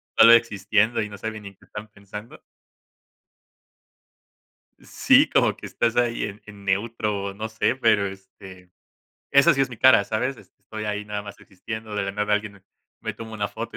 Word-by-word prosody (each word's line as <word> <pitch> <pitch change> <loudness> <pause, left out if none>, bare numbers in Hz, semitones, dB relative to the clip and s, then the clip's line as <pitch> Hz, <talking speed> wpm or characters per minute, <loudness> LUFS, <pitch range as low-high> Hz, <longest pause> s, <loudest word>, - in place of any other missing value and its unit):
solo 115 +1 +8
existiendo 110 0 +2
y 105 - -4
no 100 - -10
saben 110 +1 -6
ni 100 -1 -10
qué - - -23
están 105 +1 -9
pensando. 105 +2 -11 2.4
Sí, - - +3
como - - +2
que - - -9
estás 120 0 -1
ahí 120 -1 +1
en 105 +1 -7
en 100 -1 -13
neutro, 105 0 -1
o 100 0 -5
no 110 +2 -5
sé, 110 +3 0
pero 110 -5 +3
este 95 -1 -12 0.6
esa 140 +5 +6
sí 135 - -1
es 135 - +2
mi 120 - -10
cara, 125 -4 +6
¿sabes? 125 +6 -2
Este, - - -20
estoy 110 -1 -7
ahí 105 0 -3
nada 105 0 -5
más 100 -1 -11
existiendo, 110 +3 -8
de 105 - -1
la 100 0 -3
nada 105 +1 -1
alguien 105 -1 -3
me 95 - -20 0.4
me - - -4
toma 110 -1 -10
una 105 -2 -2
foto 115 -1 -7
105 Hz, 185 wpm, -24 LUFS, 100-115 Hz, 2.4 s, solo